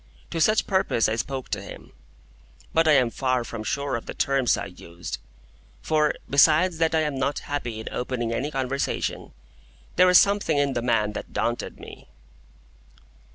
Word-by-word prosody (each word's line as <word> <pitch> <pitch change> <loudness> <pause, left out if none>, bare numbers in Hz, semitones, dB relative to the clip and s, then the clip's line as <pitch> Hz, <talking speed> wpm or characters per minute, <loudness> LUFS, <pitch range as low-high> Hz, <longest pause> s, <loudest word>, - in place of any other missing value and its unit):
To 165 - -2
such 215 +6 +3
purpose 190 - +1
I 110 - 0
spoke 130 +3 -4
to - - -2
him; - - -11 0.8
but 165 0 +3
I 155 - +6
am 125 -4 +3
far 130 -1 0
from 115 -1 -6
sure 140 +3 -2
of 115 - -6
the - - -6
terms 135 -2 +2
I - - -4
used; 85 -1 -8 0.6
for, 155 -1 +2
besides 160 +5 +4
that 165 0 +2
I 160 - +3
am 150 -3 -2
not 140 +2 0
happy 125 -6 -4
in 110 - -8
opening 120 -2 -2
any 140 +5 -2
conversation, 135 -1 -2 0.7
there 185 - +6
was 180 0 +8
something 200 -6 +2
in 140 -1 +1
the 120 - -1
man 115 -3 +1
that - - -7
daunted 120 +1 -2
me. - - -12
135 Hz, 170 wpm, -25 LUFS, 120-155 Hz, 0.8 s, was